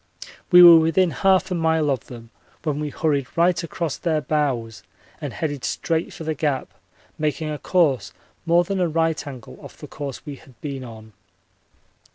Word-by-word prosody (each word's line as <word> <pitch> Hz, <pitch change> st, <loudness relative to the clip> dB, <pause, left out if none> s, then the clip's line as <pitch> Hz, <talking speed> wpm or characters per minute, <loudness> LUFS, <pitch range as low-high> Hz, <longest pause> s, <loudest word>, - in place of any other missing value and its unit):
We 180 Hz, -1 st, +9 dB
were 170 Hz, -1 st, +10 dB
within 165 Hz, +2 st, +2 dB
1/2 190 Hz, 0 st, +2 dB
a -, -, +1 dB
mile 160 Hz, -3 st, +1 dB
of 130 Hz, -4 st, -3 dB
them 115 Hz, -2 st, -11 dB, 0.3 s
when 150 Hz, -2 st, -2 dB
we 150 Hz, -1 st, -3 dB
hurried 140 Hz, -3 st, -1 dB
right 170 Hz, 0 st, +2 dB
across 170 Hz, -2 st, -4 dB
their 160 Hz, -3 st, 0 dB
bows 135 Hz, -7 st, -2 dB, 0.4 s
and -, -, -4 dB
headed 145 Hz, -5 st, -4 dB
straight 165 Hz, -1 st, -2 dB
for -, -, -9 dB
the 160 Hz, 0 st, -2 dB
Gap, 145 Hz, -3 st, -2 dB, 0.5 s
making 155 Hz, 0 st, -2 dB
a 150 Hz, -, -5 dB
course 160 Hz, -8 st, +1 dB, 0.4 s
more 170 Hz, +1 st, +4 dB
than 195 Hz, +2 st, -3 dB
a 180 Hz, -, +2 dB
right 160 Hz, -1 st, -1 dB
angle 130 Hz, -5 st, -10 dB
off -, -, -12 dB
the -, -, -10 dB
course 140 Hz, -1 st, -7 dB
we 145 Hz, -3 st, -7 dB
had 130 Hz, -3 st, -20 dB
been 140 Hz, -3 st, -6 dB
on. 110 Hz, -2 st, -12 dB
155 Hz, 180 wpm, -22 LUFS, 140-165 Hz, 0.5 s, were